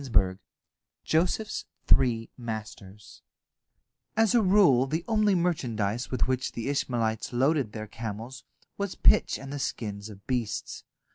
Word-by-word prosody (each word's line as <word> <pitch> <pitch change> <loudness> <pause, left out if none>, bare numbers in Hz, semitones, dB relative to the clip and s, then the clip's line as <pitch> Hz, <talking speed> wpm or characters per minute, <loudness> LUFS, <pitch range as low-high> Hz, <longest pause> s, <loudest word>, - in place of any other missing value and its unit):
JOSEPH'S 180 +7 0 0.2
THREE 115 -3 +3
MASTERS 105 -4 -8 1.0
As 220 -2 +4
a 240 - +5
rule 185 - +5
the 160 +5 -2
only 215 -3 +3
merchandise 120 - -1
with 130 - 0
which 130 0 -1
the 115 +3 -3
Ishmaelites 115 -5 -1
loaded 130 -2 +1
their 110 -1 -5
camels 115 +3 -7 0.4
was 200 -2 -2
pitch - - +4
and 135 +1 -8
the 145 - -4
skins 105 -5 -4
of 100 -1 -13
beasts. 120 -5 -3
125 Hz, 125 wpm, -28 LUFS, 110-160 Hz, 1.0 s, a